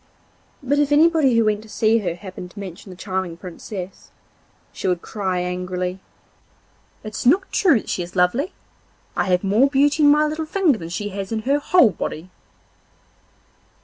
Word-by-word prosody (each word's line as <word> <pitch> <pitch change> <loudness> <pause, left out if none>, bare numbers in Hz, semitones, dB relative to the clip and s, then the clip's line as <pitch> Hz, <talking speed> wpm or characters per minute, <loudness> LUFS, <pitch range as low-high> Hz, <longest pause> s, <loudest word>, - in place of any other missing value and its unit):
But 285 +2 +1
if 290 -1 +1
anybody 305 -4 +4
who 230 - +4
went 210 -1 +1
to 220 - -15
see 220 +2 +2
her 175 -5 -3
happened 185 -1 -9
to 200 - -12
mention 190 0 -9
the 185 - -9
charming 185 -2 -4
Princess, 185 +2 -8 0.6
she - - -4
would 180 -2 0
cry 190 -4 -2
angrily: 180 +1 -3 1.0
'It's 215 0 -5
not 370 +9 +3
true 340 -10 +4
that - - -13
she - - -2
is 175 +2 -8
lovely. 215 - +1 0.6
I - - +1
have 180 -1 +1
more 215 +8 +3
beauty 290 +2 +2
in 290 - +6
my 300 +1 +5
little 310 +1 -3
finger 325 - +2
than 165 -1 -7
she 205 +4 -4
has 195 0 -6
in 220 -1 -2
her 280 +4 +2
whole 290 - +4
body. 180 0 -6
210 Hz, 175 wpm, -21 LUFS, 180-285 Hz, 1.0 s, in